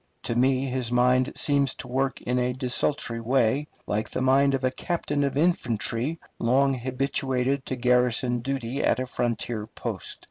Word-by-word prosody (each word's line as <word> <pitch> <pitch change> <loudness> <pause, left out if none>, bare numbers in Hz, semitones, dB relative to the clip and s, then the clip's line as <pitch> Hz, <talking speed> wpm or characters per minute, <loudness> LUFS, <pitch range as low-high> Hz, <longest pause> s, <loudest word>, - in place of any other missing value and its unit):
To 115 - -2
me 130 +2 +2
his 125 -2 -2
mind 125 +1 +3
seems 140 -2 +2
to - - -7
work 135 +2 -1
in 125 +1 -1
a 125 0 0
desultory 125 -1 0
way, 130 +4 +1 0.2
like 105 +1 -2
the - - -3
mind 135 +1 +3
of 135 - -4
a 130 - +2
captain 145 -1 -2
of 140 -1 -1
infantry 130 -3 +1 0.2
long 135 +4 +3
habituated 130 +1 -1
to 130 - -2
garrison 125 0 +2
duty 135 +1 -3
at - - +3
a 130 - -1
frontier 120 -3 -2
post. - - -6
130 Hz, 165 wpm, -26 LUFS, 125-135 Hz, 0.2 s, mind